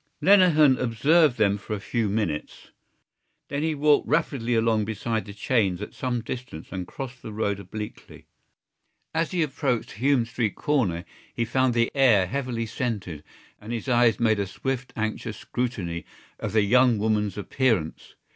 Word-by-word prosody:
Lenehan 165 -9 +5
observed 140 +4 +3
them 100 -2 +2
for 105 +2 -4
a - - -5
few 110 +1 -1
minutes. 100 -8 -3 0.8
Then 140 +1 -2
he 160 0 0
walked 145 0 +3
rapidly 135 -6 0
along 115 -1 +2
beside 110 +1 -2
the 100 - -8
chains 100 -4 +1
at 105 - -7
some 125 -3 -2
distance 120 -10 -7
and 90 -2 -5
crossed 130 -2 -7
the 110 - -7
road 105 -2 -1
obliquely. 105 +3 -9 0.9
As 165 0 0
he 180 -3 +1
approached 135 -5 -1
Hume 130 +1 +2
Street 115 -2 -2
corner 105 - 0 0.3
he 115 - 0
found 130 +1 +1
the 115 0 +2
air 120 -9 +5
heavily 125 0 -3
scented 105 - -4 0.4
and 105 +2 -9
his 120 +2 -4
eyes 120 -3 +3
made 110 -3 +2
a 100 - -1
swift 130 +5 -4
anxious 110 -1 -3
scrutiny 95 -10 -3 0.4
of - - -4
the 110 -2 +4
young 125 +2 +4
woman's 105 -2 0
appearance. 105 - -1
115 Hz, 155 wpm, -25 LUFS, 105-130 Hz, 0.9 s, Lenehan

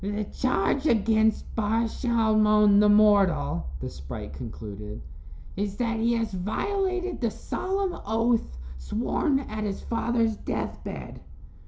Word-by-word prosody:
"The 205 +2 -2
charge 255 +6 0
against 220 -1 +2
Bar 225 +1 +1
Shalmon, 215 -3 +3
the 210 0 +5
mortal," 190 - +4
the - - -4
sprite 70 +2 -8
concluded, 105 +3 -7 0.6
"is 200 0 -3
that 230 -2 -1
he 230 +1 +2
has 225 -3 -1
violated 370 - -2
the 235 - +2
solemn 385 - -3
oath 225 - +1 0.2
sworn 270 - 0
at 215 -5 -5
his 200 -2 -3
father's 230 -2 0
death - - -4
bed." - - -7
215 Hz, 125 wpm, -26 LUFS, 200-235 Hz, 0.6 s, the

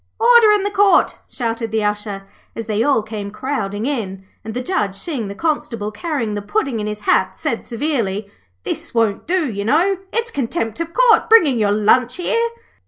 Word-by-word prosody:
'Order 470 -1 +6
in 415 -2 +1
the 405 - -1
Court,' 400 -3 +4
shouted 230 -2 -3
the 220 -1 0
Usher, 205 -1 -3 0.3
as 230 - -5
they 215 0 -1
all 270 -3 +2
came 210 -2 -6
crowding 215 -3 -3
in; 195 -9 -3 0.2
and 220 +1 -7
the 250 - -2
Judge, 210 - -1
seeing 245 - -3
the 200 - -7
Constable 230 -8 -2
carrying 235 -2 -3
the 205 - -3
Puddin' 260 - -1
in 210 - -3
his 210 0 -5
hat, - - +2
said 265 -8 -3
severely: 230 -6 -2 0.4
'This - - -5
won't 225 0 +1
do, 350 -3 +1
you 200 -4 -4
know; 345 - +2
it's 460 0 -2
Contempt 250 - -2
of 335 0 -3
Court, 480 +3 +4
bringing 320 - +5
your 205 -2 +2
lunch 230 +4 +3
here.' 465 +6 0
230 Hz, 185 wpm, -19 LUFS, 210-335 Hz, 0.4 s, Order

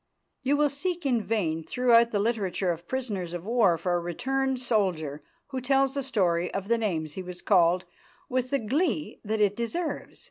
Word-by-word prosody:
You 280 +2 +2
will 295 -1 +3
seek 345 +3 -3
in 245 -4 +2
vain 170 -8 -1
through 235 +3 +4
the 230 -3 -2
literature 200 -4 0
of 170 +1 -6
prisoners 205 -10 -3
of 175 0 -5
war 215 -7 +3
for 175 +2 -1
a 175 - +2
returned 265 +10 -1
soldier 185 - 0 0.3
who 265 -2 -3
tells 270 +1 +2
the 280 - -1
story 180 -9 +1
of 195 +1 -3
the 235 0 +3
names 160 -8 -2
he 190 - -5
was 180 -1 -8
called 180 -1 +4 0.4
with 255 0 -1
the 280 - +2
glee 300 - -1
that 215 0 -1
it 205 -1 +3
deserves. 310 +10 -3
220 Hz, 185 wpm, -27 LUFS, 180-260 Hz, 0.4 s, through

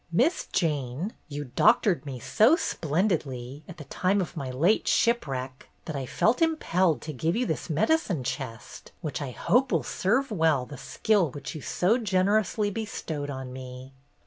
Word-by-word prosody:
''Miss 255 - +2
Jane, 150 - -1
you 145 0 -5
doctored 205 -10 +3
me 130 -2 -5
so 225 - +4
splendidly, 150 - -2
at 175 - -9
the 150 - -8
time 185 +8 0
of 180 - -3
my 135 -2 -4
late 160 +12 +2
shipwreck, 135 - 0 0.2
that 160 - -5
I 135 -2 -3
felt 220 - +1
impelled 185 - +2
to 155 - -5
give 160 +6 -1
you 245 +2 +1
this - - -3
medicine 175 - +1
chest, 120 -3 -6
which 155 -3 -4
I 140 - -3
hope 245 - +1
will 165 -7 +2
serve 235 - 0
well 160 -9 +2
the 145 - -9
skill 205 -7 +1
which 140 +2 -7
you 155 - -7
so 205 - +1
generously 205 0 +1
bestowed 165 -9 -4
on 130 -2 -6
me." 130 +1 -9
160 Hz, 165 wpm, -27 LUFS, 135-210 Hz, 0.2 s, so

